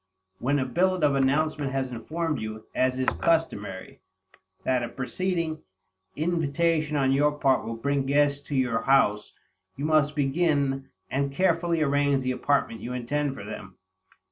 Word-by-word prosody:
When 140 Hz, +4 st, +1 dB
a 130 Hz, -, 0 dB
billet 180 Hz, +5 st, +1 dB
of 145 Hz, -2 st, +4 dB
announcement 140 Hz, +1 st, +1 dB
has 135 Hz, -1 st, -1 dB
informed 155 Hz, +5 st, -3 dB
you, 110 Hz, 0 st, -6 dB
as 130 Hz, 0 st, +1 dB
is 130 Hz, -, -1 dB
customary, 105 Hz, -, -1 dB, 0.6 s
that 130 Hz, -1 st, +1 dB
a 120 Hz, -, -3 dB
preceding 160 Hz, +4 st, -2 dB, 0.5 s
invitation 160 Hz, -1 st, 0 dB
on 135 Hz, -1 st, +2 dB
your 145 Hz, +2 st, +3 dB
part 135 Hz, -3 st, +2 dB
will 115 Hz, -, -3 dB
bring 140 Hz, +3 st, -1 dB
guests 145 Hz, 0 st, +2 dB
to 145 Hz, -, -3 dB
your 125 Hz, -4 st, +1 dB
house, 115 Hz, -5 st, +2 dB, 0.4 s
you 140 Hz, +3 st, -4 dB
must 155 Hz, -1 st, +2 dB
begin 140 Hz, -2 st, +1 dB, 0.2 s
and 140 Hz, +1 st, 0 dB
carefully 170 Hz, 0 st, +1 dB
arrange 140 Hz, -1 st, +2 dB
the 130 Hz, -, 0 dB
apartment 125 Hz, -4 st, 0 dB
you 125 Hz, -, -5 dB
intend 135 Hz, +3 st, -2 dB
for 100 Hz, -, -8 dB
them. 95 Hz, -2 st, -9 dB
140 Hz, 150 wpm, -26 LUFS, 130-155 Hz, 0.6 s, of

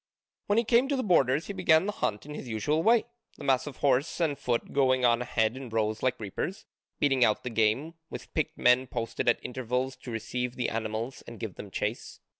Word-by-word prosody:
When 205 Hz, -, +2 dB
he 230 Hz, -, +4 dB
came 235 Hz, +3 st, +3 dB
to 280 Hz, -, 0 dB
the 260 Hz, -, -1 dB
borders 145 Hz, -, +3 dB
he 200 Hz, -, -5 dB
began 160 Hz, -2 st, +4 dB
the 210 Hz, -, -1 dB
hunt 105 Hz, -, -2 dB
in 150 Hz, -, -8 dB
his 135 Hz, -, -7 dB
usual 120 Hz, +8 st, 0 dB
way, 225 Hz, +4 st, +4 dB, 0.3 s
the -, -, -10 dB
mass 130 Hz, 0 st, +2 dB
of 140 Hz, -, -7 dB
horse 140 Hz, +4 st, +1 dB
and 160 Hz, -4 st, +1 dB
foot 120 Hz, -3 st, -2 dB
going 130 Hz, -2 st, +3 dB
on 120 Hz, 0 st, +4 dB
ahead 115 Hz, -1 st, 0 dB
in 130 Hz, -2 st, -7 dB
rows 110 Hz, -1 st, -1 dB
like 130 Hz, -, 0 dB
reapers, 175 Hz, -, -4 dB, 0.3 s
beating 135 Hz, -3 st, +3 dB
out 110 Hz, -2 st, +2 dB
the 125 Hz, -, -4 dB
game, 115 Hz, +8 st, +1 dB, 0.2 s
with -, -, -9 dB
picked 155 Hz, -, -1 dB
men 125 Hz, +1 st, +4 dB
posted 120 Hz, -1 st, -1 dB
at 120 Hz, -, +4 dB
intervals 130 Hz, +1 st, -2 dB
to -, -, -10 dB
receive 120 Hz, +2 st, -3 dB
the 125 Hz, -, -1 dB
animals 115 Hz, +3 st, -3 dB
and -, -, -9 dB
give -, -, -5 dB
them -, -, -9 dB
chase. -, -, -4 dB
130 Hz, 220 wpm, -28 LUFS, 115-155 Hz, 0.3 s, he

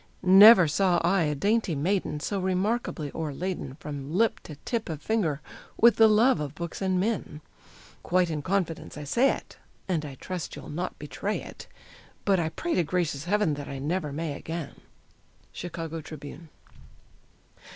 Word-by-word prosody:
Never 190 Hz, 0 st, +9 dB
saw 180 Hz, +3 st, +2 dB
I 175 Hz, 0 st, +3 dB
a 150 Hz, 0 st, -1 dB
dainty 205 Hz, +2 st, +1 dB
maiden 160 Hz, 0 st, -1 dB
so 200 Hz, +4 st, -2 dB
remarkably 185 Hz, -, -1 dB
o'erladen 160 Hz, -2 st, -4 dB
From 145 Hz, -1 st, -6 dB
lip 220 Hz, +6 st, +2 dB
to 150 Hz, -, -8 dB
tip 230 Hz, -5 st, -2 dB
of 155 Hz, -3 st, -4 dB
finger 160 Hz, -7 st, -1 dB, 0.4 s
with 235 Hz, +1 st, +6 dB
the 225 Hz, -, +7 dB
love 220 Hz, 0 st, +4 dB
of 150 Hz, -1 st, -5 dB
books 170 Hz, +2 st, -6 dB
and 185 Hz, -1 st, +1 dB
men; 195 Hz, -7 st, -2 dB, 0.6 s
Quite 180 Hz, -1 st, +1 dB
in 150 Hz, -2 st, -2 dB
confidence 180 Hz, -2 st, -2 dB
I 150 Hz, -, -6 dB
say 240 Hz, -, +3 dB
it, -, -, -5 dB, 0.3 s
and 170 Hz, -5 st, 0 dB
I 140 Hz, -3 st, -7 dB
trust 180 Hz, +5 st, -6 dB
you'll -, -, -9 dB
not 175 Hz, +4 st, -4 dB
betray 175 Hz, +8 st, -3 dB
it, -, -, -11 dB, 0.6 s
But 195 Hz, -2 st, +3 dB
I 160 Hz, -2 st, 0 dB
pray 340 Hz, -, -3 dB
to 175 Hz, -, +2 dB
gracious 160 Hz, -3 st, -2 dB
heaven 205 Hz, -3 st, +2 dB
that 145 Hz, -1 st, -6 dB
I 140 Hz, -, -5 dB
never 150 Hz, +2 st, -2 dB
may 155 Hz, +1 st, -3 dB
again. 160 Hz, 0 st, -6 dB, 0.8 s
_Chicago 165 Hz, -2 st, -6 dB
Tribune. 155 Hz, +2 st, -10 dB
170 Hz, 160 wpm, -27 LUFS, 150-195 Hz, 0.8 s, Never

